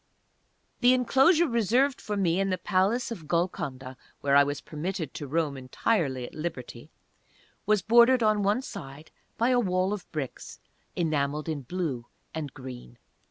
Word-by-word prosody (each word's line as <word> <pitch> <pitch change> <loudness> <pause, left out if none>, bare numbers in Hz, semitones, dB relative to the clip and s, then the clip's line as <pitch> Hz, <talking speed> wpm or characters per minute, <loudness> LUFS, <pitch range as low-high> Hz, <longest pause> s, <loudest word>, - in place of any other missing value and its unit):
The 250 +1 +5
enclosure 270 +7 +4
reserved 245 +3 +1
for 210 -1 -3
me 180 -2 +1
in 195 0 +1
the 185 - 0
Palace 210 +7 +1
of 170 -9 -7
Golconda, 140 -6 -2 0.3
where 140 0 +2
I 140 - +8
was 145 0 -3
permitted 165 +2 -5
to 145 - -6
roam 155 0 0
entirely 130 - -1
at - - -11
liberty, 150 -5 -6 0.8
was 210 -3 +3
bordered 235 +2 +5
on 215 -1 +3
one 205 +6 +1
side 145 - -9 0.3
by 235 +2 +2
a 250 -1 +4
wall 185 -2 +1
of 205 - -7
bricks 145 -5 -6 0.4
enameled 150 -2 -1
in 155 -3 -3
blue 135 -5 -4 0.3
and 155 -4 -4
green. 125 - -10
175 Hz, 155 wpm, -27 LUFS, 140-215 Hz, 0.8 s, I